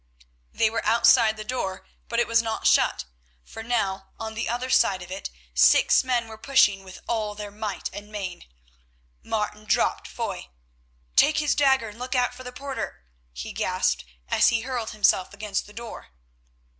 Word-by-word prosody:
They 220 Hz, -1 st, +2 dB
were 230 Hz, -, -2 dB
outside 230 Hz, 0 st, +5 dB
the 215 Hz, -, -5 dB
door, 215 Hz, -5 st, -4 dB, 0.2 s
but 235 Hz, -, 0 dB
it 240 Hz, -, +3 dB
was 230 Hz, -1 st, +4 dB
not 225 Hz, -1 st, -4 dB
shut, 60 Hz, -, +3 dB, 0.4 s
for 225 Hz, -, -9 dB
now, 195 Hz, -5 st, -1 dB
on 220 Hz, 0 st, -5 dB
the 220 Hz, -, -3 dB
other 250 Hz, +2 st, -2 dB
side 190 Hz, -6 st, +3 dB
of 180 Hz, -, -12 dB
it 190 Hz, -, -5 dB, 0.2 s
six -, -, +5 dB
men 245 Hz, -3 st, 0 dB
were 220 Hz, -1 st, -10 dB
pushing 205 Hz, -7 st, +3 dB
with 190 Hz, -1 st, -12 dB
all 215 Hz, -3 st, -1 dB
their 205 Hz, -1 st, -7 dB
might 210 Hz, 0 st, -4 dB
and 205 Hz, +1 st, -9 dB
main. 190 Hz, -4 st, -6 dB, 0.7 s
Martin 210 Hz, -1 st, -3 dB
dropped 195 Hz, -, +1 dB
Foy. 65 Hz, -, -5 dB, 0.7 s
"Take 310 Hz, -, +5 dB
his 300 Hz, -2 st, +2 dB
dagger 265 Hz, -5 st, +3 dB
and 210 Hz, +3 st, -13 dB
look 255 Hz, +1 st, -3 dB
out 250 Hz, -1 st, +2 dB
for 255 Hz, +1 st, -11 dB
the 250 Hz, -, -7 dB
porter," 265 Hz, -, -6 dB, 0.3 s
he -, -, -7 dB
gasped -, -, 0 dB, 0.2 s
as -, -, +4 dB
he 230 Hz, -1 st, +2 dB
hurled 245 Hz, -2 st, -3 dB
himself 205 Hz, -2 st, +2 dB
against 205 Hz, -1 st, -3 dB
the -, -, -13 dB
door. 235 Hz, +1 st, -8 dB
220 Hz, 175 wpm, -25 LUFS, 205-240 Hz, 0.7 s, outside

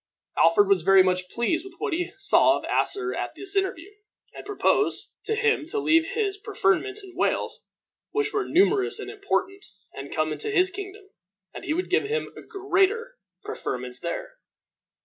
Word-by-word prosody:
Alfred 165 Hz, +5 st, +5 dB
was 195 Hz, -3 st, +3 dB
very 190 Hz, +2 st, +6 dB
much 180 Hz, 0 st, 0 dB
pleased 320 Hz, -, -1 dB
with 380 Hz, -2 st, -12 dB
what 425 Hz, -1 st, -2 dB
he 355 Hz, +2 st, -2 dB
saw 390 Hz, -, +4 dB
of -, -, -7 dB
Asser 380 Hz, -2 st, 0 dB
at -, -, -4 dB
this 395 Hz, 0 st, 0 dB
interview, 385 Hz, -1 st, -1 dB, 0.4 s
and -, -, -9 dB
proposed 410 Hz, 0 st, 0 dB
to 445 Hz, -, 0 dB
him 445 Hz, -8 st, +1 dB
to 430 Hz, -, -3 dB
leave 330 Hz, -5 st, +2 dB
his 410 Hz, -3 st, -1 dB
preferments 400 Hz, -, 0 dB
in 370 Hz, -2 st, -13 dB
Wales, -, -, -1 dB, 0.5 s
which 430 Hz, 0 st, -1 dB
were 410 Hz, -2 st, -1 dB
numerous 390 Hz, +2 st, +3 dB
and -, -, -6 dB
important, 395 Hz, -1 st, -2 dB, 0.3 s
and 135 Hz, +1 st, -8 dB
come 155 Hz, 0 st, 0 dB
into 155 Hz, -, -3 dB
his 375 Hz, -2 st, +2 dB
kingdom, 395 Hz, 0 st, -9 dB, 0.4 s
and -, -, -8 dB
he 305 Hz, -, 0 dB
would 365 Hz, +2 st, -3 dB
give 390 Hz, -, +2 dB
him 450 Hz, +3 st, -3 dB, 0.2 s
greater 405 Hz, +4 st, 0 dB, 0.2 s
preferments 125 Hz, 0 st, -5 dB
there. -, -, -6 dB
385 Hz, 170 wpm, -25 LUFS, 310-415 Hz, 0.5 s, very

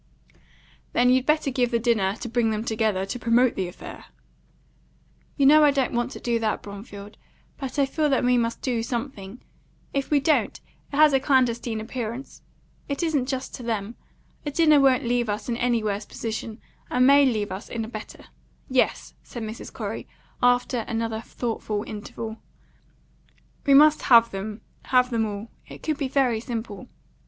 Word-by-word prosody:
"Then 250 Hz, +1 st, +4 dB
you'd 260 Hz, 0 st, +2 dB
better 305 Hz, -2 st, +2 dB
give 245 Hz, -2 st, +1 dB
the 235 Hz, -, +1 dB
dinner 220 Hz, -5 st, +1 dB
to 240 Hz, -, -4 dB
bring 235 Hz, -1 st, +1 dB
them 215 Hz, 0 st, -2 dB
together, 220 Hz, -4 st, 0 dB
to 195 Hz, +6 st, -5 dB
promote 235 Hz, +1 st, +3 dB
the 185 Hz, -, -2 dB
affair." 175 Hz, -, -10 dB, 1.3 s
"You 280 Hz, -, +3 dB
know 305 Hz, +2 st, +7 dB
I 295 Hz, -, +7 dB
don't 270 Hz, -3 st, 0 dB
want 240 Hz, +1 st, 0 dB
to -, -, -8 dB
do 235 Hz, -1 st, 0 dB
that, 220 Hz, -1 st, -1 dB
Bromfield. 200 Hz, 0 st, -10 dB, 0.4 s
But 270 Hz, 0 st, -5 dB
I 280 Hz, -, +4 dB
feel 300 Hz, +2 st, 0 dB
that 270 Hz, -2 st, +2 dB
we 250 Hz, 0 st, +3 dB
must 230 Hz, -1 st, -1 dB
do 245 Hz, -3 st, 0 dB
something. 230 Hz, -2 st, -5 dB, 0.5 s
If 275 Hz, -1 st, -1 dB
we 295 Hz, -, +4 dB
don't, 300 Hz, +3 st, +1 dB, 0.3 s
it -, -, -5 dB
has 300 Hz, 0 st, +6 dB
a 270 Hz, -, +4 dB
clandestine 245 Hz, -4 st, +1 dB
appearance. 235 Hz, +3 st, -6 dB, 0.5 s
It 280 Hz, +4 st, -2 dB
isn't 295 Hz, -6 st, 0 dB
just 265 Hz, -1 st, -4 dB
to -, -, -7 dB
them. 225 Hz, -2 st, -3 dB, 0.5 s
A 295 Hz, -, -3 dB
dinner 305 Hz, 0 st, +4 dB
won't 270 Hz, -2 st, +4 dB
leave 240 Hz, -1 st, 0 dB
us 210 Hz, +1 st, -3 dB
in 240 Hz, -, -1 dB
any 240 Hz, -2 st, +1 dB
worse 205 Hz, 0 st, -2 dB
position, 225 Hz, 0 st, -5 dB, 0.3 s
and 250 Hz, 0 st, +3 dB
may 280 Hz, +1 st, +7 dB
leave 215 Hz, -7 st, 0 dB
us 190 Hz, +2 st, -7 dB
in 225 Hz, -2 st, -3 dB
a -, -, -8 dB
better. 215 Hz, -2 st, -9 dB, 0.4 s
Yes," 255 Hz, -1 st, 0 dB
said 235 Hz, -, -8 dB
Mrs. 220 Hz, +1 st, -7 dB
Corey, -, -, -5 dB, 0.3 s
after 245 Hz, 0 st, +2 dB
another 225 Hz, -1 st, -2 dB
thoughtful 220 Hz, -3 st, -3 dB
interval, 220 Hz, +1 st, -7 dB, 1.3 s
"we 275 Hz, -, +6 dB
must 305 Hz, +2 st, +6 dB
have 230 Hz, -2 st, +6 dB
them 210 Hz, +2 st, -6 dB, 0.2 s
have 250 Hz, -1 st, +3 dB
them 225 Hz, -2 st, +1 dB
all. 205 Hz, +2 st, -7 dB, 0.2 s
It -, -, -12 dB
could 310 Hz, -2 st, -2 dB
be 275 Hz, -, -1 dB
very 255 Hz, -4 st, +1 dB
simple." 225 Hz, -4 st, -6 dB
240 Hz, 175 wpm, -25 LUFS, 220-265 Hz, 1.3 s, know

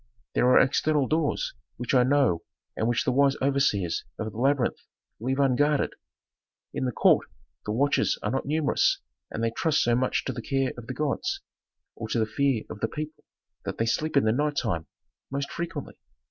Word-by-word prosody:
"There 125 Hz, -, +3 dB
are 125 Hz, -, +6 dB
external 140 Hz, +1 st, +3 dB
doors 155 Hz, -1 st, 0 dB, 0.2 s
which 120 Hz, +2 st, -3 dB
I 130 Hz, -, +6 dB
know 130 Hz, -10 st, +3 dB, 0.3 s
and 110 Hz, -, 0 dB
which 120 Hz, 0 st, +1 dB
the -, -, +1 dB
wise 140 Hz, +1 st, +4 dB
overseers 130 Hz, -11 st, +1 dB
of 110 Hz, 0 st, -3 dB
the 110 Hz, -, -11 dB
labyrinth 135 Hz, -1 st, +2 dB, 0.4 s
leave 130 Hz, +4 st, -1 dB
unguarded. 140 Hz, +2 st, +2 dB, 0.8 s
In -, -, -1 dB
the 125 Hz, -, 0 dB
court -, -, +4 dB, 0.4 s
the -, -, 0 dB
watches 140 Hz, +6 st, +2 dB
are 105 Hz, -, 0 dB
not 135 Hz, +1 st, -2 dB
numerous 155 Hz, 0 st, +2 dB, 0.3 s
and 115 Hz, -, -4 dB
they 115 Hz, -, +1 dB
trust 155 Hz, +5 st, +1 dB
so 120 Hz, 0 st, +3 dB
much 130 Hz, +1 st, 0 dB
to -, -, -2 dB
the 120 Hz, -, -5 dB
care 135 Hz, +2 st, 0 dB
of 120 Hz, -2 st, -10 dB
the 130 Hz, -, -5 dB
gods, 375 Hz, -, -1 dB, 0.5 s
or 110 Hz, -, -6 dB
to 110 Hz, -, -1 dB
the 110 Hz, -, +3 dB
fear 135 Hz, 0 st, +1 dB
of -, -, -8 dB
the 115 Hz, -, 0 dB
people 155 Hz, +5 st, -6 dB, 0.4 s
that -, -, -4 dB
they 115 Hz, -, +1 dB
sleep 150 Hz, +6 st, 0 dB
in 140 Hz, -, +5 dB
the 110 Hz, -, +4 dB
night 145 Hz, +4 st, 0 dB
time 85 Hz, -, -1 dB, 0.4 s
most 140 Hz, +1 st, -3 dB
frequently. 170 Hz, 0 st, -5 dB
135 Hz, 190 wpm, -27 LUFS, 115-145 Hz, 0.8 s, are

